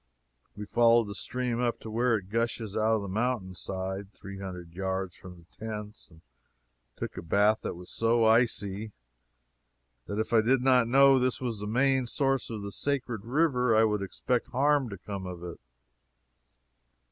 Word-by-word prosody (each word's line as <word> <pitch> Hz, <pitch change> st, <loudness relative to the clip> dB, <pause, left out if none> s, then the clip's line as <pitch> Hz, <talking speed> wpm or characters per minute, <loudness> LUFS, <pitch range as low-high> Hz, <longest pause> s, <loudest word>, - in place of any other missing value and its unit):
We 105 Hz, 0 st, -6 dB
followed 115 Hz, +2 st, +4 dB
the -, -, -5 dB
stream 125 Hz, +2 st, -2 dB
up 120 Hz, -1 st, 0 dB
to 110 Hz, -, -7 dB
where 115 Hz, +1 st, +2 dB
it 95 Hz, -1 st, -10 dB
gushes 115 Hz, -2 st, -1 dB
out 110 Hz, +1 st, +2 dB
of 110 Hz, -, -1 dB
the -, -, -5 dB
mountain 110 Hz, -1 st, -1 dB
side, 95 Hz, +1 st, -5 dB
three 100 Hz, 0 st, -10 dB
hundred 90 Hz, -3 st, -8 dB
yards 95 Hz, 0 st, -3 dB
from 90 Hz, -1 st, -12 dB
the 85 Hz, -, -18 dB, 0.2 s
tents, 105 Hz, -1 st, -6 dB
and 80 Hz, -2 st, -19 dB, 0.7 s
took -, -, -6 dB
a -, -, -4 dB
bath 105 Hz, +6 st, +3 dB
that -, -, -4 dB
was 90 Hz, +1 st, -11 dB
so 115 Hz, 0 st, +2 dB
icy 110 Hz, -2 st, +1 dB, 1.1 s
that 100 Hz, -, -4 dB
if 110 Hz, +2 st, -2 dB
I 110 Hz, -, +6 dB
did 125 Hz, +3 st, +2 dB
not 125 Hz, -3 st, +4 dB
know 135 Hz, +2 st, +6 dB
this 130 Hz, 0 st, 0 dB
was 120 Hz, -5 st, -3 dB
the 105 Hz, -, -5 dB
main 130 Hz, +2 st, +2 dB
source 135 Hz, +1 st, 0 dB
of 110 Hz, -3 st, -5 dB
the 100 Hz, -, -5 dB
sacred 120 Hz, -2 st, -2 dB
river, 125 Hz, -3 st, +2 dB
I 110 Hz, -, +5 dB
would 105 Hz, -2 st, +1 dB
expect 120 Hz, +5 st, -1 dB
harm 140 Hz, 0 st, +2 dB
to 100 Hz, -, -7 dB
come 95 Hz, 0 st, -6 dB
of 90 Hz, -1 st, -7 dB
it. 85 Hz, -1 st, -7 dB
110 Hz, 180 wpm, -29 LUFS, 100-125 Hz, 1.1 s, I